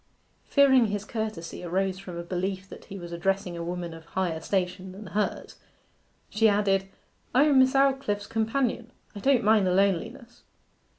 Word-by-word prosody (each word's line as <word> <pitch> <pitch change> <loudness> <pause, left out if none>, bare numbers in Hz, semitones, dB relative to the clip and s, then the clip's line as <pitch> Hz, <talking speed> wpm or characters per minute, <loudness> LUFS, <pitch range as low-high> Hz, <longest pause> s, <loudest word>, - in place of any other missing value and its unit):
Fearing 265 -4 +5
his 205 0 -3
courtesy 215 -8 -5
arose 190 +2 -1
from 185 -3 -8
a 170 - -4
belief 185 +2 -3
that - - -11
he 195 - -8
was 175 -2 -8
addressing 185 +1 -1
a 170 - -5
woman 175 -1 -4
of 165 0 -11
higher 175 -2 -2
station 185 +1 -2
than 200 +3 -10
was 195 - -11
hers, 210 0 -2 0.7
she 220 +1 +3
added, 195 -2 +1 0.5
'I 265 - +6
am 290 -3 +5
Miss 260 0 +5
Aldclyffe's 270 -7 +2
companion. 230 +2 -1 0.2
I 205 - -7
don't 260 +1 +3
mind 210 -2 +4
the 180 - +2
loneliness. 200 +5 -1
195 Hz, 170 wpm, -27 LUFS, 180-225 Hz, 0.7 s, I